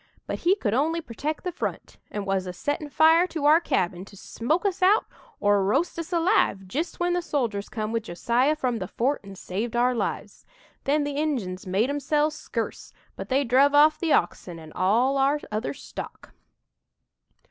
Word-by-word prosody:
but - - -4
he 360 +3 +3
could 220 - -2
only 315 +7 +1
protect 300 +2 -5
the 360 - -2
front 350 - -5
and 205 -1 -4
was 195 -1 -1
a 180 - -5
settin' 290 - -3
fire 320 +4 +5
to 315 -4 -4
our 310 +3 +6
cabin 180 - -1
to 200 0 -14
smoke 305 - -2
us 390 -1 -1
out 400 +4 +4 0.3
or 205 -1 +3
roast 275 - 0
us 335 +2 -6
alive, 335 - +2
jist 300 - -3
when 350 0 +1
the 355 - 0
soldiers 235 -11 -2
come 215 -2 -3
with 230 0 0
Josiah 235 - +1
from 255 -6 -1
the - - -4
fort 270 +5 -1
and 195 -1 -11
saved 215 +6 -4
our 245 +1 +3
lives. 235 - -4 0.4
Then 290 +2 +2
the 285 -1 -3
Injuns 230 -13 -2
made 205 +8 +1
'emselves 295 +2 0
scurce - - -5 0.2
but - - -7
they 275 +2 +2
druv 275 +4 +4
off 305 +1 +6
the 330 -2 -1
oxen 175 -3 0
and 160 -1 -12
all 235 +9 +2
our 280 +2 +2
other 210 -10 -2
stock. - - -9
270 Hz, 185 wpm, -25 LUFS, 205-310 Hz, 0.4 s, our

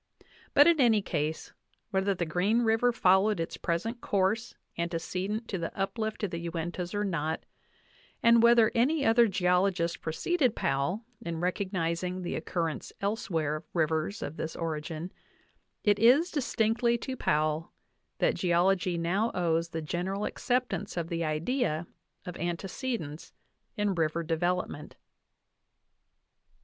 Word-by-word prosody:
But 290 - +8
in 335 -4 +5
any 225 -5 +4
case, 155 -3 -3 0.4
whether 195 0 +1
the 175 - -1
Green 195 +9 +1
River 225 +2 +3
followed 190 -2 +3
its 165 - -3
present 220 +8 -2
course 205 +4 0 0.2
ante 170 0 -2
cedent 195 +7 -3
to 190 - -2
the 165 - -3
uplift 215 +3 -2
of 200 - -1
the 170 - -3
Uintas 175 +3 -4
or 205 - 0
not, 160 -4 -2 0.8
and 235 0 +6
whether 235 -1 +6
any 280 +5 +2
other 230 +1 +5
geologist 180 -2 +1
preceded 255 - 0
Powell 140 - -1 0.2
in 170 -6 -4
recognizing 180 0 -1
the 175 - -3
occurrence 165 -3 -3
elsewhere 165 -7 -1
of 155 - -10
rivers 160 +4 0
of 145 - -6
this 160 - -4
origin, 160 +1 -4 0.7
it 205 -2 +3
is 265 - +5
distinctly 235 -4 +1
to 260 +2 -5
Powell 155 -5 0 0.5
that - - +2
geology 180 0 +2
now 190 +7 +1
owes 165 -1 +1
the 165 -2 -4
general 190 +6 -2
acceptance 245 -6 -1
of 170 -1 -2
the 170 -1 -1
idea 160 - -1 0.4
of 180 -2 -6
ante 175 +3 -3
cedence 185 - -5 0.4
in 205 -1 +1
river 165 -1 0
development. 170 -1 -2
180 Hz, 135 wpm, -29 LUFS, 165-220 Hz, 0.8 s, But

